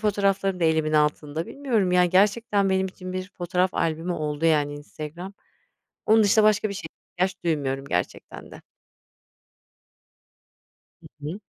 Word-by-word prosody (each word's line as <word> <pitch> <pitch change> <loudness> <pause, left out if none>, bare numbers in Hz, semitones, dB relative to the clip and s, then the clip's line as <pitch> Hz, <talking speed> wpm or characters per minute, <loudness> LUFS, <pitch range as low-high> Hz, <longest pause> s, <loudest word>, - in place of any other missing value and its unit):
fotoğraflarım 195 -3 0
da - - +2
elimin 160 -1 +2
altında. 150 +1 0
Bilmiyorum, 230 -10 0
yani, 180 -1 +4
gerçekten 205 +1 +2
benim 190 0 +1
için 185 0 -8
bir 185 +1 -5
fotoğraf 180 +1 0
albümü 165 +2 -1
oldu, 150 -1 -3
yani, 145 -2 +2
Instagram. 155 +6 -8 0.7
Onun 220 0 +5
dışında 210 +1 +4
başka 215 0 +3
bir - - -4
şeye 200 - -6 0.3
ihtiyaç 185 +2 0
duymuyorum 140 -4 -1
gerçekten 90 -8 -4
de. - - -12 2.4
Hı - - -13 0.2
hı. 185 +7 -6
180 Hz, 135 wpm, -25 LUFS, 155-200 Hz, 2.4 s, Onun